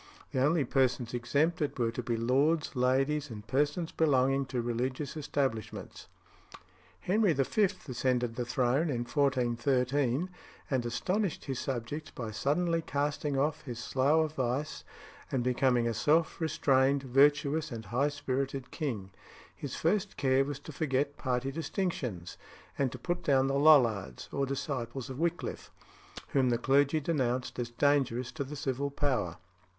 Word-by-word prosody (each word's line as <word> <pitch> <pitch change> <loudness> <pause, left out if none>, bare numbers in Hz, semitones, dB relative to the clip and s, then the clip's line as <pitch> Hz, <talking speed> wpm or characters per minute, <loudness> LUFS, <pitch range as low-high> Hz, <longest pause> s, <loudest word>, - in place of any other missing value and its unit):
The 130 - +1
only 155 +1 +3
persons 125 -2 +1
exempted 145 +6 0
were 115 -2 +1
to 120 - -4
be 120 -1 -2
lords, 140 +7 +1
ladies, 135 +3 +1
and 105 -2 -8
persons 145 +7 0
belonging 135 -3 +2
to 130 -2 -2
religious 125 +5 -2
establishments. 135 -7 -3 0.9
Henry 200 -1 +3
V. 140 +9 0 0.3
ascended 125 -2 0
the 125 - -1
throne 125 +6 +1
in 120 -4 -1
1413, 130 +3 +1 0.4
and 130 -3 +1
astonished 180 - -1
his 135 -3 -3
subjects 135 +4 -4
by 115 -3 -6
suddenly 165 +9 +1
casting 145 -1 -1
off 150 +3 0
his 120 -4 -5
slough 140 +6 +2
of 155 - -7
vice, 135 +2 -2 0.5
and 130 -2 0
becoming 125 -1 +2
a 115 - 0
self 155 +10 +2
restrained, 140 -3 +2
virtuous, 145 +3 +3
and 115 -2 -6
high 125 +9 +1
spirited 135 -2 -3
king. 115 - -4 0.4
His 140 - -6
first 195 +4 0
care 130 0 +3
was 140 0 -4
to 155 - -9
forget 145 -1 -1
party 130 0 -1
distinctions, 135 - -3 0.4
and 135 -3 0
to - - -7
put 175 0 -2
down 135 -2 +3
the 135 +1 +1
Lollards, 115 - +4
or 140 0 -1
disciples 135 -2 -4
of 130 - -7
Wickliffe, 170 +1 -2 0.6
whom 130 -2 +2
the 120 - +2
clergy 140 +5 +3
denounced 130 -6 -1
as 120 -1 -2
dangerous 130 -1 +1
to 150 - -3
the 140 +2 -7
civil 140 -1 -2
power. 130 - -1
135 Hz, 145 wpm, -31 LUFS, 125-150 Hz, 0.9 s, Lollards